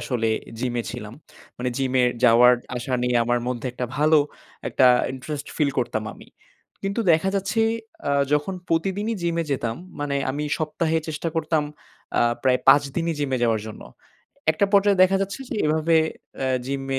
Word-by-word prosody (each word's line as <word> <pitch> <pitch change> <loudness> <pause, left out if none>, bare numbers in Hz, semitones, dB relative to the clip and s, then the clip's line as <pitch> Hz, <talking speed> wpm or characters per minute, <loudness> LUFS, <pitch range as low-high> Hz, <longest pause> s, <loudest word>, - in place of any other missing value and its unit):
আসলে 115 -3 -1 0.3
জিমে 120 -1 -1
ছিলাম। 115 -2 -7 0.4
মানে 125 +1 -1
জিমে 130 -1 +1 0.2
যাওয়ার-আসা 125 +1 +4
নিয়ে 125 0 +1
আমার 120 +1 +1
মধ্যে 125 -1 -3
একটা 125 0 -3
ভালো 155 +1 +5 0.5
একটা 130 - +4 0.3
ইন্টারেস্ট 145 +3 -6
ফিল 150 -3 +2
করতাম 115 -3 -1
আমি। - - -15 0.5
কিন্তু 200 +3 -1
দেখা 165 +4 +2
যাচ্ছে 215 +3 0 0.5
আ - - +1 0.2
যখন 150 +6 +1
প্রতিদিনই 195 +7 0
জিমে 170 -1 0
যেতাম, 120 -4 -1 0.2
মানে 145 -1 -1
আমি 145 +3 -3
সপ্তাহে 160 +1 -1
চেষ্টা 155 +2 -3
করতাম 160 -1 +1 0.6
আ - - +4 0.2
প্রায় 125 -1 +3
৫ 145 - +8
দিনই 165 -1 -1
জিমে 135 -3 0
যাওয়ার 115 -3 +2
জন্য। 110 - -10 0.7
একটা 200 +6 +1
পর্যায়ে 200 -1 +4
দেখা 190 +1 +4
যাচ্ছে 200 +7 -5
যে - - -3
এভাবে 160 +2 +2 0.4
অ্যা 135 - -1 0.2
জিমে 135 0 -2
145 Hz, 155 wpm, -23 LUFS, 125-165 Hz, 0.7 s, ৫